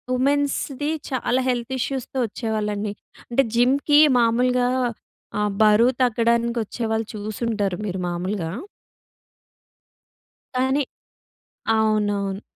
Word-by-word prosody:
ఉమెన్స్‌ది 285 +1 0 0.2
చాలా 255 0 0
హెల్త్ 245 0 -1
ఇష్యూస్‌తో 265 +1 -3
ఒచ్చేవాళ్ళండి. 210 -2 -2 0.4
అంటే, 260 +3 +3
జిమ్‌కి 275 +5 +4 0.2
మాములుగా 245 +2 +2 0.7
ఆహ్, 210 0 +1
బరువు 215 +3 +5
తగ్గడానికొచ్చేవాళ్ళు 235 -2 0
చూసుంటారు 210 -2 -2
మీరు 190 -2 -3
మాములుగా. 175 0 -3 2.0
కానీ 265 +3 +2 0.9
అవునవును. 205 -2 0
230 Hz, 75 wpm, -23 LUFS, 210-255 Hz, 2.0 s, బరువు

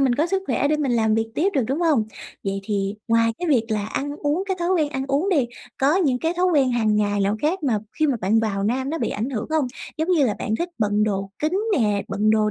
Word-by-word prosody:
mình 260 -3 +3
có 310 +5 +1
sức 385 +1 -1
khỏe 285 - +1
để 305 - +2
mình 280 -5 0
làm 220 -2 +2
việc 225 0 +1
tiếp 370 +6 +2
được, 270 - +3
đúng 275 +6 -1
hông? 300 -10 +3 0.4
Vậy 195 0 -2
thì 200 -1 -1
ngoài 230 0 +3
cái 350 -2 -2
việc 245 -6 +3
là 210 -1 -1
ăn 285 +6 -3
uống, 305 +5 0
cái 380 -1 -1
thói 345 - 0
quen 315 -5 +2
ăn 265 -3 -3
uống 285 +8 +1
đi, 285 -10 +2 0.3
có 285 +6 +3
những 275 -9 +2
cái 325 +4 0
thói 365 +1 +2
quen 280 -8 +3
hằng 220 -3 +2
ngày 205 -1 +1
nào 200 +2 +1
khác 335 +3 0
mà, 235 -7 +1 0.2
khi 310 - +3
mà 270 -4 +1
bạn 210 +4 +2
vào 200 -3 -1
Nam 260 +5 0
nó 325 - -2
bị - - -1
ảnh 225 +6 -3
hưởng 220 -5 -3
hông? 310 -4 +2 0.3
Giống 315 +3 -1
như 325 -6 +4
là 210 - 0
bạn 220 - -1
thích 345 - -2
bận 210 0 +2
đồ 195 -2 -2
kín 310 +3 -1 0.3
nè, 205 -3 +1
bận 205 +2 +1
đồ 215 -1 +3
255 Hz, 275 wpm, -23 LUFS, 215-310 Hz, 0.4 s, như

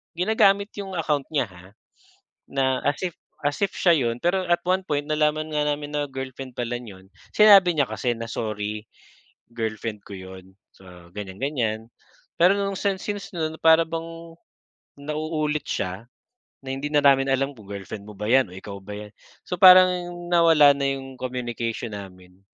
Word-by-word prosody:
ginagamit 200 +2 +2
'yong 195 -2 -6
account 150 -4 0
niya 140 -4 +2
ha, 90 0 -15 0.9
na 130 -1 +1
as 145 0 +1
if 175 - -4 0.3
as 145 0 0
if 200 - +1
siya 175 - +4
yun. 115 0 -2
Pero 180 +2 +1
at 175 - +4
one 185 +1 +2
point, 145 -4 -1
nalaman 155 0 +1
nga 150 - +1
namin 145 0 -3
na 145 0 0
girlfriend 130 -1 -7
pala 120 0 -3
niya 100 -6 -12
'yon, - - -21 0.3
sinabi 200 -4 +7
niya 140 -3 +3
kasi 120 -2 -1
na 115 0 -7
sorry, 105 -1 -4 0.7
girlfriend 110 -1 -4
ko - - -10
yun. 95 0 -12 0.2
So 90 -2 -15
ganyan-ganyan 110 +2 -3 0.5
pero 180 +3 +5
no'ng 200 -1 -2
sin 200 -1 0
since 205 -1 -5
no'n 160 -2 -3
para 160 0 +6
bang 165 0 -7 0.6
nauulit 155 0 -2
siya, 95 +5 -3 0.6
na 130 - -6
hindi 140 +2 -4
na 150 - +3
namin 135 -1 +5
alam 135 +1 +1
kung 110 -5 -16
girlfriend 100 +1 -7
mo 105 - -10
ba 105 - -4
yan 125 -3 +3
o - - -12
ikaw 100 +1 -8
ba 100 - -12
yan? 105 0 -9 0.3
So 180 - -3
parang 185 -1 +9 0.4
nawala 165 -4 +6
na 140 0 -1
yung 135 -1 -6
communication 120 -3 -4
namin. 95 -2 -11
135 Hz, 170 wpm, -24 LUFS, 110-165 Hz, 0.9 s, parang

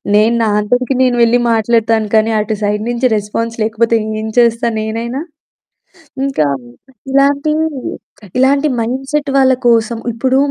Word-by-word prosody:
నేను 220 +3 +3
నా - - +1
అంతటికి 245 +5 0
నేను 250 -1 +2
వెళ్లి 240 +1 +3
మాట్లాడతాను 225 -1 +1
కానీ 220 +1 +3
అటు 215 0 -2
సైడ్ 210 +1 -1
నుంచి 240 +1 +1
రెస్పాన్స్ 230 +3 -4
లేకపోతే 230 +1 +1 0.2
ఏం 220 - -4
చేస్తా 235 0 +2
నేనైనా! 230 +5 -3 1.1
ఇంకా 155 - 0 0.6
ఇలాంటి 280 +2 +2 0.8
ఇలాంటి 275 +3 +3
మైండ్సెట్ 270 +5 -2
వాళ్ళ 260 -1 +4
కోసం 230 0 +2 0.2
ఇప్పుడు 260 +3 0
235 Hz, 125 wpm, -15 LUFS, 220-260 Hz, 1.1 s, వాళ్ళ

